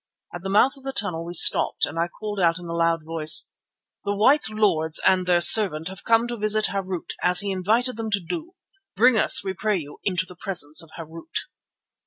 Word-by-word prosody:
At 175 - -8
the 195 - -6
mouth 245 +8 +2
of 270 - -18
the 270 0 -5
tunnel 175 -8 -4
we 175 +1 -8
stopped - - +3
and 160 +3 -7
I 170 - 0
called 205 +3 -7
out 170 -2 +1
in 175 - -10
a 170 - -6
loud 165 -1 -1
voice: 160 -1 +2 0.5
"The 205 0 -3
white 260 +6 +2
lords 180 -8 -1
and 185 -1 +2
their 175 -1 +2
servant 175 -5 +5
have 190 - -10
come 230 +1 +2
to 240 - -5
visit 215 0 +1
Harût, 190 -3 -5
as 180 0 +2
he 200 -1 -4
invited 220 +6 -1
them 225 -1 -5
to 200 -1 0
do. 330 - -7 0.4
Bring 240 +5 +4
us, 215 - +5
we 190 - -3
pray 210 +2 -2
you, 145 -4 -10
into 185 -1 -2
the 180 -1 -14
presence 165 -5 -1
of 165 - -14
Harût." 165 0 -6
190 Hz, 215 wpm, -22 LUFS, 165-215 Hz, 0.5 s, servant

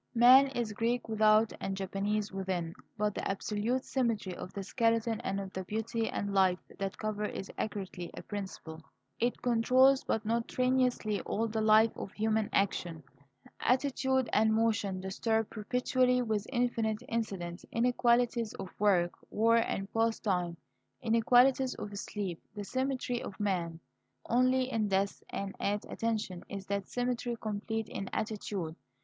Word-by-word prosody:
Man 255 +4 +8
is 240 -5 -3
Greek 230 +3 -1
without 215 0 +4
and 195 0 -3
Japanese 200 +2 -1
within. 185 -4 -3 0.2
But 210 -1 0
the - - -3
absolute 210 +6 -1
symmetry 230 -8 -1
of 180 - -7
the 200 - -5
skeleton 230 +1 +1
and 195 +1 -2
of 195 -1 -6
the 190 - -3
beauty 225 +3 -2
and 200 0 -3
life 190 -2 +4 0.2
that 195 0 -3
cover 210 -1 -2
it - - -5
is 195 - -6
accurately 190 -4 -4
a - - -8
principle. 190 -6 -7 0.4
It 240 +1 0
controls, 255 +3 +4
but 220 -1 -1
not 230 +1 0
tyrannously, 250 -4 +1
all 225 +2 -1
the 220 0 -2
life 215 +1 +5
of 190 - -6
human 220 0 0
action. 175 -5 0 0.6
Attitude 265 0 +1
and 220 +1 +4
motion 215 -4 +1
disturb 220 +3 -1
perpetually, 250 +3 +1
with 215 -3 -1
infinite 235 -3 0
incidents 195 -6 -3
inequalities 235 -1 +2
of 190 -1 -6
work, 185 -4 +3 0.2
war, 230 +2 +3
and 195 -4 0
pastime, 195 -6 0 0.5
inequalities 245 +3 +4
of 205 -1 -6
sleep 195 -4 -4
the 205 - -4
symmetry 260 +1 -2
of 190 - -8
man. 175 -5 -1 0.5
Only 255 +1 +2
in 220 -3 +1
death 195 0 0
and 195 -1 -4
"at 205 +1 -1
attention" 215 -6 -2
is 195 -1 -6
that 200 -1 -2
symmetry 245 -1 -2
complete 220 +1 -3
in 195 - -5
attitude. 200 -6 -3
215 Hz, 145 wpm, -31 LUFS, 195-235 Hz, 0.6 s, Man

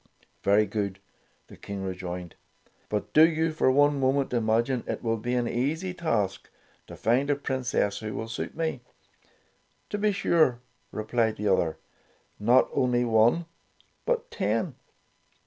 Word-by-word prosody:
''Very 105 +2 +4
good,'' 100 -1 -3 0.5
the - - -14
King 100 -1 -6
rejoined, 90 -2 -5 0.6
"but 105 -1 -3
do 155 - +8
you 160 0 0
for 155 -4 +2
one 145 +1 +4
moment 135 0 +1
imagine 115 +2 +1
it - - -4
will 115 -1 +1
be 120 +3 -2
an 120 -1 +1
easy 160 +11 -1
task 115 - -1 0.4
to - - -9
find 125 +6 +1
a 145 - +3
Princess 125 -7 -1
who 110 -2 -5
will 110 - -4
suit 115 - -5
me 160 -6 -2 0.5
?" - - -40
"To 205 - -2
be 210 0 +2
sure," 160 -10 +2 0.3
replied 110 +1 0
the 105 -1 -1
other; 85 -4 +1 0.6
"not 120 +5 +4
only 125 -1 +2
one, 115 +9 +3 0.6
but - - 0
ten." - - -1
120 Hz, 145 wpm, -27 LUFS, 105-145 Hz, 0.6 s, do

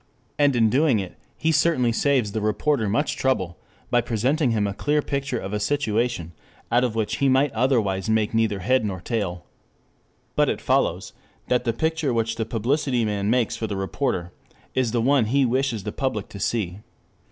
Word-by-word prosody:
And 145 -2 +4
in 115 -2 +3
doing 140 -2 +3
it, 95 -3 -5 0.2
he 160 - +1
certainly 150 -6 +2
saves 125 -3 +1
the 110 +1 -2
reporter 110 +2 +1
much 140 +8 0
trouble, 95 -10 -1 0.3
by 120 - +4
presenting 130 +6 +1
him 110 -3 +1
a 100 - -2
clear 150 +8 0
picture 140 -3 -2
of 100 -2 -5
a 105 - 0
situation 115 - -1 0.4
out 120 +1 +4
of 120 -3 -1
which 110 0 -1
he 140 - +2
might 135 +1 +3
otherwise 110 -5 +1
make 110 -1 +1
neither 110 -3 +1
head 130 +5 +2
nor 95 -3 -3
tail. 95 -4 -3 0.9
But - - +3
it - - -1
follows - - 0 0.4
that 125 -1 +1
the 115 - +2
picture 160 0 0
which 115 0 -1
the 115 - -1
publicity 120 +2 0
man 100 -1 -1
makes 120 0 +1
for 115 -1 -3
the 100 -2 -4
reporter 95 -3 -2 0.4
is 130 -2 +1
the 120 0 +1
one 135 -2 +3
he 135 +5 +2
wishes 125 -3 0
the 105 - -4
public 120 -6 -3
to 100 - -9
see. 100 -4 -2
115 Hz, 185 wpm, -24 LUFS, 105-135 Hz, 0.9 s, And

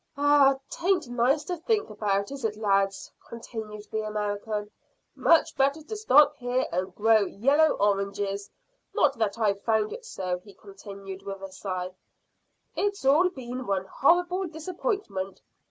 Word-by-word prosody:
"Ah, 285 -1 +5
'tain't 355 -4 0
nice 250 +5 +2
to 360 - -3
think 415 +6 0
about, 200 0 -1
is 275 -2 -7
it, 215 -2 -1
lads?" 195 -2 0 0.2
continued 220 -2 -7
the 220 - -1
American; 210 0 -3 0.4
"much 330 - +3
better 280 +3 +1
to 385 +8 -6
stop 300 -8 +5
here 250 0 0
and 185 +1 -2
grow 220 +1 +5
yellow 280 +11 +3
oranges 200 0 -1 0.5
not 280 -2 +3
that 220 -1 0
I've 200 -3 +1
found 220 -1 +1
it - - -8
so," 185 - -3
he 195 +1 -16
continued, 195 -1 -10
with 195 -1 -7
a 195 - -7
sigh. 185 -1 -4 0.8
"It's 405 -7 -1
all 310 +7 +5
been 255 -5 -7
one 190 -1 0
horrible 355 - +2
disappointment. 315 - -4
220 Hz, 145 wpm, -27 LUFS, 200-290 Hz, 0.8 s, Ah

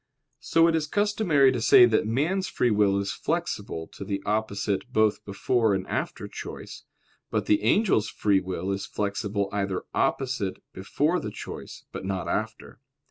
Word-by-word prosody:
So 165 +2 +3
it 165 - +2
is 155 -2 0
customary 205 -8 +3
to 125 -3 -2
say 120 - +8
that 110 -2 +1
man's 165 - 0
free 120 - +1
will 100 -2 +3
is 100 0 -1
flexible 80 -2 -3
to - - -9
the 100 0 -4
opposite 105 +1 -1
both 110 -3 +2
before 110 +2 +1
and 95 - -3
after - - -3
choice; - - -9 0.4
but - - -1
the 105 - +3
angel's 115 - +2
free 100 -2 +2
will 95 +1 -3
is 100 0 -3
flexible 100 0 -2
either 100 -2 -2
opposite 125 -8 -1 0.2
before 150 - 0
the 105 - -5
choice, - - -9
but - - -6
not 95 -1 -3
after. - - -4
105 Hz, 160 wpm, -26 LUFS, 100-135 Hz, 0.4 s, say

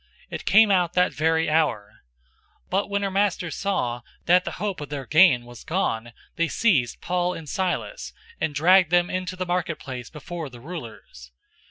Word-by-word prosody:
It - - -6
came 215 +1 +6
out 180 -3 +2
that 180 0 +2
very 160 +1 +1
hour. 150 -10 0 0.6
016:019 - - -38
But 195 +2 0
when 200 0 -1
her 195 - -1
masters 190 -4 0
saw 125 -12 -1 0.2
that 180 +1 +4
the - - -4
hope 200 -6 -4
of 145 - -7
their 140 -2 -5
gain 155 -5 +5
was 120 -1 -12
gone, 120 -10 -2 0.2
they 170 0 +2
seized 150 - +1
Paul 180 0 -1
and 160 -2 -9
Silas, 190 - -3 0.3
and 145 - -2
dragged 180 +3 +5
them 175 0 +2
into 185 0 -3
the 185 0 -3
marketplace 165 -8 -3
before 160 0 -7
the 120 -2 -12
rulers. 115 - -10
170 Hz, 175 wpm, -24 LUFS, 140-185 Hz, 0.6 s, came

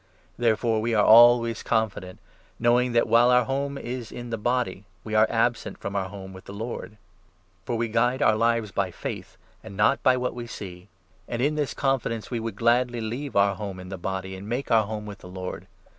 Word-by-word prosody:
Therefore 115 -1 +1
we 115 +1 0
are 105 - +4
always 115 0 +6
confident, 105 -5 -1 0.4
knowing 120 +1 +2
that, 115 - +3
while 120 +1 +5
our 125 0 +5
6 - - -9
home 140 +1 -2
is 125 -2 -6
in 120 -1 -7
the 115 - -1
body, 120 -4 -1 0.2
we 110 - -6
are 110 0 +5
absent 120 +1 0
from 100 - -6
our 95 -1 -1
home 95 -1 -9
with 95 - -12
the 100 - -9
Lord. 110 0 -6 0.7
For 120 - -2
we 115 0 0
guide 120 +3 +1
our 110 -6 +4
lives 115 -1 +1
by 100 -1 -1
faith, 90 - -7 0.3
and 100 - -10
not 105 0 +3
by 130 -1 +4
what 125 0 -2
we 120 -1 -7
7 - - -8
see. 90 -2 -9 0.4
And 120 - -4
in 145 +4 +2
this 150 -2 -2
confidence 130 -5 -1
we 120 - -1
would 115 -2 -4
gladly 120 +2 +2
leave 120 +6 -5
our 100 0 +4
home 100 -1 -6
8 - - -7
in 90 - -10
the 95 - -5
body, 95 +1 -4
and 100 +3 -9
make 125 +4 -3
our 110 -3 +4
home 105 -1 -5
with 105 -1 -9
the - - -12
Lord. 90 0 -7
115 Hz, 220 wpm, -25 LUFS, 100-120 Hz, 0.7 s, always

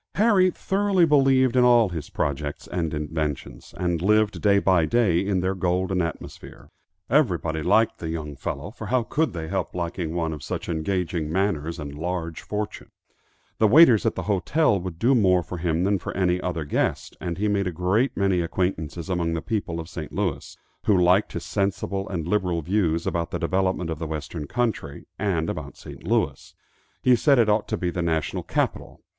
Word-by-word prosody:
Harry 200 -3 +4
thoroughly 195 0 +1
believed 135 -4 +4
in 125 - +5
all 120 -4 +5
his 80 -5 -6
projects 70 +1 -3
and 85 -3 -2
inventions, 75 -4 -4
and 90 -2 -1
lived 105 +2 +2
day 100 -1 +4
by 95 -4 +3
day 100 -2 +2
in 95 -2 0
their 95 +1 0
golden 90 0 0
atmosphere. 85 -1 -7 0.4
Everybody 90 - +1
liked 105 +7 +2
the 80 - -4
young 75 -3 -5
fellow, 70 +7 -5
for 110 -2 -8
how 125 +1 +1
could 155 +7 0
they 80 -2 -5
help 95 0 -3
liking 85 -1 -3
one 80 -2 -1
of 75 - -8
such - - -5
engaging 85 -1 -2
manners 85 -3 -1
and 75 -3 -6
large 85 +1 -4
fortune? 105 0 -5 0.7
The 110 - +5
waiters 125 -2 +7
at - - 0
the - - -3
hotel 105 - +2
would 90 -2 -6
do 120 +8 +3
more 95 -7 +3
for 90 - -7
him 85 0 0
than 100 0 +1
for - - -6
any 90 -1 +1
other 85 -4 -3
guest, 70 - -1
and 85 -1 -3
he 105 +2 0
made 100 -2 +1
a - - -1
great 90 - 0
many 95 -3 +2
acquaintances 85 -2 -2
among 85 -3 -1
the - - -1
people 100 -7 -2
of 80 - -6
St. 80 -3 -7
Louis, - - -3 0.3
who 105 - +5
liked 90 +3 +3
his - - -5
sensible 100 -1 -2
and 85 -4 -3
liberal 90 -4 0
views 85 -2 0
about 85 -1 -1
the - - -3
development 95 -2 0
of 80 - -4
the 80 - -4
western 75 0 -5
country, 110 -12 -2
and 85 -6 0
about - - -5
St. - - -11
Louis. - - -1 0.5
He 125 -1 +6
said 140 +3 +3
it 115 -3 +4
ought 105 +1 +2
to - - -2
be 90 -1 -2
the 90 - -3
national 80 -2 -1
capital. - - -3
90 Hz, 190 wpm, -24 LUFS, 80-105 Hz, 0.7 s, waiters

